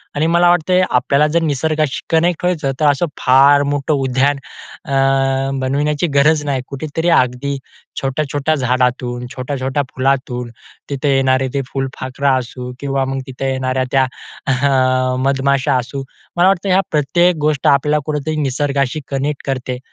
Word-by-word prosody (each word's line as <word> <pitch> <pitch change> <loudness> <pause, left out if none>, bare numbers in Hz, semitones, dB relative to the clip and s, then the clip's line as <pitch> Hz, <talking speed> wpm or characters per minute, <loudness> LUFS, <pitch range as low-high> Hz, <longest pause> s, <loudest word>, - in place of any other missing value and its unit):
आणि 150 +2 +1
मला 175 +1 +4
वाटतंय 180 +2 +3
आपल्याला 140 +4 +2
जर 170 - +2
निसर्गाशी 155 0 0
कनेक्ट 170 +1 +1
व्हायचं 160 -6 0
तर 155 - +2
असं 145 +5 +1
फार 140 +2 +5
मोठं 145 +1 -1
उद्यान 135 +1 +1 0.5
अ, 140 - -7 0.7
बनविण्याची 145 +5 0
गरज 150 +2 +4
नाही 135 -3 -1
कुठेतरी 155 +4 -3
अगदी 135 -1 +1 0.4
छोट्या-छोट्या 145 +2 -1
झाडातून 125 -1 -1
छोट्या-छोट्या 130 +1 -2
फुलातून 130 -2 -1 0.4
तिथं 140 +1 -2
येणारे 130 -1 +2
ते 140 - 0
फुलफाखरा 135 +1 -2
असू 125 0 -6
किंवा 135 -1 -1
मग 135 0 -3
तिथं 130 +1 -5
येणाऱ्या 130 -1 -1
त्या 135 -1 +4 0.4
अ, 130 -1 +2
मधमाशा 135 0 +1
असू. 130 +2 -4 0.3
मला 180 +2 +5
वाटतं 195 0 +1
ह्या 190 +1 +4
प्रत्येक 170 +4 +2
गोष्ट 150 -3 +1
आपल्याला 150 +2 +3
कुठेतरी 155 0 -2
निसर्गाशी 140 +1 -1
कनेक्ट 140 +1 -2
करते 130 -1 -2
140 Hz, 140 wpm, -17 LUFS, 130-150 Hz, 0.7 s, फार